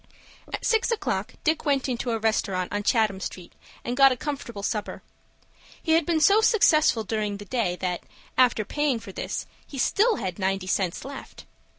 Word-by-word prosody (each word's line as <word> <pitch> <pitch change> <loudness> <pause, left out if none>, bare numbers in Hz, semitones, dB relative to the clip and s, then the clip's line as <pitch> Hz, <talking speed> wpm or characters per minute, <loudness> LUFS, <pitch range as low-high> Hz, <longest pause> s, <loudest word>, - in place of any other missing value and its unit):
At - - -4
six 450 +1 +2
o'clock 465 -2 -2
Dick 315 0 +1
went 280 -3 +1
into 245 -1 -2
a 230 - 0
restaurant 200 -5 -1
on 205 - 0
Chatham 215 -3 +2
Street, 180 -1 -7 0.3
and 245 - -2
got 270 0 +7
a 255 - -1
comfortable 240 -8 -5
supper. 210 0 -3 0.8
He 320 - -2
had 325 -1 +3
been 335 -2 +2
so 405 +7 +5
successful 310 - +4
during 210 -1 -2
the 205 - -10
day 210 -6 -1
that, 180 -1 -3 0.3
after 240 -4 +3
paying 290 0 0
for 200 -3 -10
this, - - -4 0.2
he 280 - -9
still 430 - +3
had 185 - -4
ninety 190 0 0
cents 185 +1 -1
left. 275 0 -9
235 Hz, 180 wpm, -25 LUFS, 200-295 Hz, 0.8 s, got